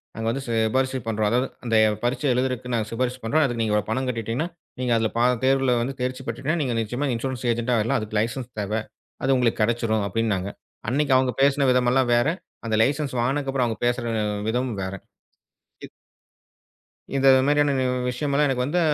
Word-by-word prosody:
நாங்க 115 0 -3
வந்து 135 +4 -2
சிபாரிசு 120 +4 +1
பண்றோம். 110 -1 0
அதாது 125 +4 +1 0.2
அந்த 115 -2 0 0.3
பரிட்சை 130 +4 0
எழுதுறதுக்கு 125 -1 -1
நாங்க 110 -2 0
சிபாரிசு 125 +2 -1
பண்றோம். 155 +8 +2
அதுக்கு 120 -3 -2
நீங்க 110 -2 0
இவ்ளோ 105 -2 +1
பணம் 130 +4 -1
கட்டிட்டீங்கன்னா 115 +5 -2 0.3
நீங்க 125 -1 -1
அதுல 110 -1 +1
பா 120 - +3 0.2
தேர்வுல 135 -1 +3
வந்து 130 +3 -2
தேர்ச்சி 130 +1 -2
பெற்றுட்டா 135 +7 -1
நீங்க 130 -4 -1
நிச்சயமா 120 +6 -2
இன்சுரேன்ஸ் 125 +1 -3
ஏஜெண்ட்டா 120 +1 0
ஆயிடலாம், 115 +5 +1
அதுக்கு 110 0 -4
லைசென்ஸ் 120 +3 -2
தேவ. 100 0 -3 0.5
அது 135 0 +3
உங்களுக்குக் 125 -3 +1
கடச்சுரும் 110 -2 0
அப்டின்னாங்க. 100 -2 -1 0.4
அன்னைக்கு 140 +2 +1
அவங்க 130 -1 +2
பேசின 140 0 +3
விதமெல்லாம் 125 0 +2
வேற, 120 +3 +3 0.4
அந்த 110 - +1
லைசென்ஸ் 140 +1 -1
வாங்குனக்கப்புறம் 135 0 0
அவங்க 115 - -3
பேசுற 120 0 0 0.4
விதம் 125 +2 -1
வேற. 95 +1 -4 0.9
இ - - -13 1.2
இந்த 135 0 +2 0.2
மாரியான 145 0 +3 0.4
விஷயம்லாம் 140 +3 +1
எனக்கு 130 -2 0
வந்து 150 +6 0
125 Hz, 170 wpm, -24 LUFS, 115-135 Hz, 1.2 s, பா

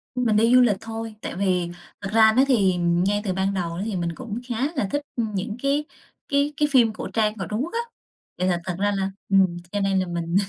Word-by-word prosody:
Ưm, 250 0 0
mình 215 -2 +3
đi 230 +3 +5
du 255 - +8
lịch 215 -6 +3
thôi, 225 -1 -6
tại - - -5
vì 180 -2 0 0.3
thật 195 - -4
ra 220 -1 +7
đó 255 +4 +4
thì 200 -9 +3
ngay 175 +4 +1
từ 190 - -1
ban 190 +1 0
đầu 170 -3 -3
đó 190 - -2
thì 215 -4 -3
mình 170 -1 -2
cũng 235 -2 -5
khá 250 +3 0
là 265 -8 0
thích, 290 - 0
ưm, 220 -4 -2
những 210 +3 -3
cái 285 +2 +1 0.4
cái 285 0 +1
cái 295 - +3
phim 235 -5 +4
cổ - - -6
trang 215 -1 +1
của 190 - -3
Trung 215 +3 -1
Quốc 340 - -6
á. 465 - 0 0.6
Vậy 185 - 0
là 175 -2 +1
thật 185 -1 -3
ra 205 +1 +2
là 195 0 -1 0.2
ừm, 190 -3 +3
cho 205 - -1
nên 195 -1 +1
là 185 - -1
mình 170 0 -3
205 Hz, 260 wpm, -24 LUFS, 185-235 Hz, 0.6 s, du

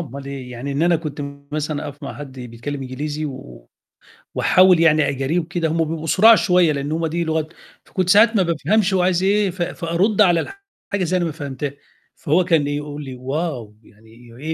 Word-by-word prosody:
أُمّال 140 -3 -7
إيه 135 -2 -7
يعني، 125 +3 -5
إن 140 +3 -1
أنا 170 0 +4
كنت 155 -2 -6 0.3
مثلًا 150 0 -3
أقف 145 +1 -12
مع 140 - -6
حد 145 -2 -9
بيتكلم 125 +4 -6
إنجليزي 145 +4 -4
و 95 - -9 0.7
وأحاول 185 -2 +5
يعني 155 -3 +4
أجاريه 140 +6 -1
وكده 170 0 -2
هُم 165 +1 +1
بيبقوا 160 0 -4
سُراع 220 +8 +7
شوية، 180 -5 +3
لأنه 145 +2 -3
هُم 165 0 -1
دي 170 +2 -2
لغتهم، 160 0 -3 0.3
فكنت 185 -2 -2
ساعات 220 +4 +6
ما 195 - +4
بافهمش 190 +5 +1
هوعايز 185 -1 +2
إيه، 200 +1 +2
ف 180 0 -7
فأرُدّ 175 +4 0
على 180 - +3 0.4
حاجة 200 -2 0
إزاي 180 +2 0
أنا 175 - 0
ما 165 - -2
فهمتهاش؟ 140 -2 -5 0.4
فهو 165 +5 +1
كان 165 -5 +2
يقول 145 0 -4
لي: 130 -2 -7
wow! 135 -4 -4
يعني 110 +1 -21 0.3
إيه 155 +3 -3
160 Hz, 190 wpm, -20 LUFS, 140-175 Hz, 0.7 s, سُراع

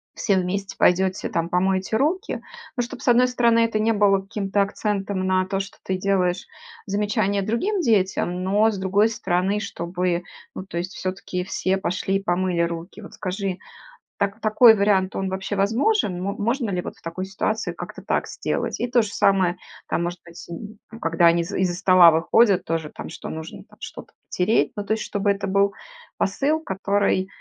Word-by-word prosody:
все 200 - +1
вместе 190 +2 -2
пойдете, 190 +1 +2
там 165 0 -1
помоете 190 +3 0
руки. 335 - 0 0.3
Ну, 245 - 0
чтоб, 240 - -6
с - - -9
одной 245 +1 +5
стороны, 235 -2 +3
это 230 -1 +2
не 220 +1 +2
было 200 -2 +3
каким-то 200 0 -1
акцентом 195 -2 -2
на 185 0 +2
то, 195 +1 -2
что 195 +1 -6
ты 190 - -1
делаешь 185 -1 0 0.4
замечание 205 0 0
другим 360 - 0
детям, 185 - +1
но 210 +4 +3
с 200 - -5
другой 200 +4 +3
стороны, 190 0 0
чтобы, 175 -2 -2 0.3
ну, 190 - -6
то 170 -2 -4
есть 185 +2 -5
всё-таки 185 -1 -4
все 190 0 -1
пошли 190 +1 -1
помыли 175 -1 0
руки. 170 +4 -4
Вот 205 - -11
скажи, 190 0 -3 0.6
так 200 +2 -1
такой 220 +1 +7
вариант, 200 -2 +2
он 195 -1 -1
вообще 190 +2 -3
возможен? 210 - +1
Мо 200 +1 -2
можно 235 +2 -1
ли 180 -2 -1
вот - - -7
в - - -23
такой 170 +3 -5
ситуации 205 +3 -2
как-то - - -8
так - - -1
сделать? - - -3
И 245 - 0
то 240 0 +4
же 215 - -3
самое 185 -2 +2 0.3
там, 170 - 0
может 175 0 -4
быть, 170 0 -12 0.5
когда 165 +1 +2
они 170 0 +4
из 200 +4 -7
из-за 185 -2 +1
стола 185 -2 +7
выходят 185 +5 +3
тоже 160 -2 -2
там, - - -7
что - - -8
нужно 160 0 -7
там - - -21
что-то - - -9 0.2
потереть, 185 +5 +1
ну, 205 - -3
то 220 - +1
есть 220 - -2
чтобы 205 0 0
это 200 0 -3
был 200 +1 +2 0.4
посыл, 280 +11 0
который 195 -4 0
195 Hz, 180 wpm, -23 LUFS, 185-210 Hz, 0.6 s, такой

